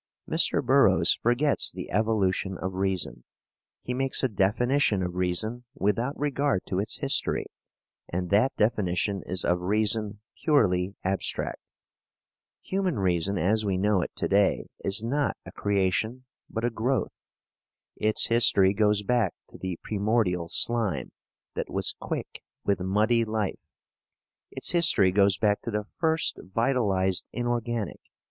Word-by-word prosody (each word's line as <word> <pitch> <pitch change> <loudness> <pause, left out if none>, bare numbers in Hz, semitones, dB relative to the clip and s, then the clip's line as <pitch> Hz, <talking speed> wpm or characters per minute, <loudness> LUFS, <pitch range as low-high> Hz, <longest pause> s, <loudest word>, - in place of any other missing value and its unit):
Mr. - - +1
Burroughs - - +5
forgets 125 +5 +2
the - - -8
evolution 100 -3 0
of 95 +2 -4
reason. 95 -10 -2 0.6
He 125 - -3
makes 135 +1 0
a - - +4
definition 110 +1 +1
of 90 -1 -3
reason 90 +7 -2
without 120 +3 -1
regard 140 -8 0
to 95 - -1
its 105 +2 -2
history, - - 0 0.6
and 90 +1 -3
that 110 +7 +3
definition 100 -3 0
is 90 0 -2
of 90 0 +1
reason 105 +2 0 0.2
purely 100 - +2
abstract. 95 +1 -2 1.0
Human 190 - -1
reason, 95 0 0
as 105 +7 +1
we 95 -3 0
know 100 0 +2
it - - -3
to - - -1
day, 100 0 +2 0.2
is 100 +3 +2
not 140 +5 -1
a - - -9
creation, 100 +5 -1 0.2
but 115 +1 -3
a 120 - 0
growth. 120 +3 -1 0.8
Its 110 0 +1
history 105 -5 +5
goes 105 0 +2
back 115 -4 +1
to - - -13
the 95 -2 -4
primordial 100 -5 0
slime 105 - +2 0.4
that - - -4
was - - 0
quick - - -5 0.2
with 100 - +1
muddy 105 +5 +2
life; 110 -3 -3 0.8
its - - -4
history 160 - +4
goes 100 0 +3
back 105 -1 +1
to - - -5
the 105 -1 -2
first 160 -1 0
vitalized 95 -4 0
inorganic. 120 -3 -2
105 Hz, 135 wpm, -26 LUFS, 95-120 Hz, 1.0 s, Burroughs